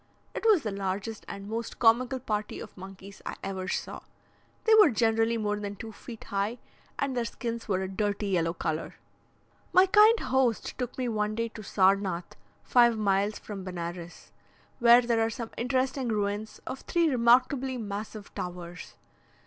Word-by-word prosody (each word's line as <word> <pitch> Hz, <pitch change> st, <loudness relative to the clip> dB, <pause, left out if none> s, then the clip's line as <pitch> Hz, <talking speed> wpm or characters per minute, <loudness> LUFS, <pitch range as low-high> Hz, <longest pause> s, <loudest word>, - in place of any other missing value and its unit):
It -, -, -5 dB
was 410 Hz, -8 st, +5 dB
the 215 Hz, -, -2 dB
largest 195 Hz, +2 st, -4 dB
and 200 Hz, 0 st, -7 dB
most 225 Hz, +2 st, -4 dB
comical 250 Hz, +3 st, +3 dB
party 215 Hz, -4 st, -3 dB
of 215 Hz, -, -10 dB
monkeys 195 Hz, +1 st, -11 dB
I -, -, -5 dB
ever 190 Hz, -1 st, -4 dB
saw. -, -, -3 dB, 0.6 s
They 445 Hz, -, +4 dB
were 425 Hz, -6 st, +8 dB
generally 225 Hz, -1 st, +2 dB
more 210 Hz, -1 st, -1 dB
than 205 Hz, -1 st, -5 dB
two 220 Hz, +3 st, -8 dB
feet 225 Hz, +1 st, -10 dB
high, 200 Hz, +4 st, -2 dB, 0.4 s
and 275 Hz, -2 st, -1 dB
their 240 Hz, -, 0 dB
skins 230 Hz, -1 st, -5 dB
were 190 Hz, -3 st, 0 dB
a -, -, -3 dB
dirty 205 Hz, +1 st, -2 dB
yellow 165 Hz, -3 st, +1 dB
colour. 160 Hz, -1 st, -3 dB, 0.8 s
My 370 Hz, +1 st, +7 dB
kind 425 Hz, +4 st, +6 dB
host 255 Hz, -4 st, 0 dB
took 250 Hz, -1 st, -4 dB
me 255 Hz, -1 st, -1 dB
one 215 Hz, -2 st, -1 dB
day 230 Hz, +1 st, -1 dB
to 220 Hz, -, -10 dB
Sarnath 195 Hz, -3 st, +1 dB, 0.3 s
(five 240 Hz, -2 st, +4 dB
miles 200 Hz, 0 st, +1 dB
from 200 Hz, -3 st, -8 dB
Benares), 175 Hz, -1 st, -7 dB, 0.5 s
where 240 Hz, 0 st, +7 dB
there 235 Hz, -1 st, +1 dB
are 225 Hz, -, +1 dB
some 230 Hz, 0 st, -6 dB
interesting 260 Hz, +1 st, 0 dB
ruins 210 Hz, 0 st, -2 dB
of 265 Hz, -, -5 dB
three 340 Hz, -1 st, +1 dB
remarkably 255 Hz, +1 st, +3 dB
massive 210 Hz, -1 st, -6 dB
towers. 175 Hz, -1 st, -7 dB
220 Hz, 165 wpm, -28 LUFS, 195-245 Hz, 0.8 s, were